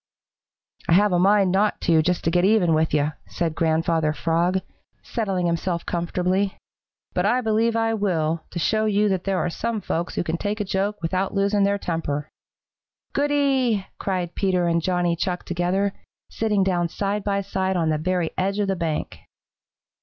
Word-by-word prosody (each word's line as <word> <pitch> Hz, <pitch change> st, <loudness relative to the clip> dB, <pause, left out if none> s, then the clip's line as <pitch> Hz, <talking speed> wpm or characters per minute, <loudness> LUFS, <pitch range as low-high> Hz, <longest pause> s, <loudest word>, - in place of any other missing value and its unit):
"I -, -, +5 dB
have 205 Hz, +3 st, +5 dB
a 175 Hz, -, +3 dB
mind 195 Hz, 0 st, +4 dB
not 205 Hz, +3 st, +1 dB
to, 165 Hz, -2 st, +4 dB
just 180 Hz, +2 st, 0 dB
to 165 Hz, -, +1 dB
get 175 Hz, +1 st, +2 dB
even 195 Hz, -4 st, +4 dB
with 160 Hz, 0 st, +2 dB
you," 150 Hz, 0 st, +1 dB, 0.2 s
said 165 Hz, -3 st, -2 dB
Grandfather 160 Hz, -1 st, +1 dB
Frog, 175 Hz, +4 st, +1 dB, 0.4 s
settling 195 Hz, -6 st, -2 dB
himself 170 Hz, 0 st, -1 dB
comfortably, 180 Hz, +3 st, -1 dB, 0.6 s
"but -, -, +1 dB
I 250 Hz, +1 st, +2 dB
believe 225 Hz, 0 st, +1 dB
I 225 Hz, 0 st, +1 dB
will, 165 Hz, -6 st, 0 dB
to -, -, -7 dB
show 215 Hz, +5 st, +1 dB
you 210 Hz, 0 st, +2 dB
that 190 Hz, -2 st, -1 dB
there 195 Hz, -1 st, 0 dB
are 175 Hz, -, -1 dB
some 230 Hz, +5 st, -2 dB
folks 175 Hz, -2 st, -3 dB
who -, -, 0 dB
can 165 Hz, 0 st, -2 dB
take 205 Hz, +4 st, -3 dB
a 210 Hz, -, -1 dB
joke 195 Hz, +1 st, -2 dB
without 185 Hz, +4 st, -1 dB
losing 200 Hz, 0 st, +2 dB
their 200 Hz, 0 st, +1 dB
temper." 155 Hz, -5 st, -3 dB, 0.8 s
"Goody!" 275 Hz, -7 st, +1 dB
cried 180 Hz, -3 st, -2 dB
Peter 185 Hz, -3 st, +1 dB
and 170 Hz, 0 st, +2 dB
Johnny 175 Hz, -1 st, +1 dB
Chuck 180 Hz, +1 st, -3 dB
together, 180 Hz, +3 st, 0 dB, 0.4 s
sitting 210 Hz, -3 st, +1 dB
down 175 Hz, -2 st, +1 dB
side 200 Hz, +3 st, -2 dB
by 200 Hz, -1 st, 0 dB
side 190 Hz, -1 st, -1 dB
on 165 Hz, -2 st, +1 dB
the 155 Hz, -1 st, 0 dB
very 180 Hz, 0 st, 0 dB
edge 195 Hz, +2 st, 0 dB
of 205 Hz, -1 st, 0 dB
the 195 Hz, -, +1 dB
bank. 160 Hz, -3 st, -3 dB
185 Hz, 175 wpm, -23 LUFS, 170-205 Hz, 0.8 s, I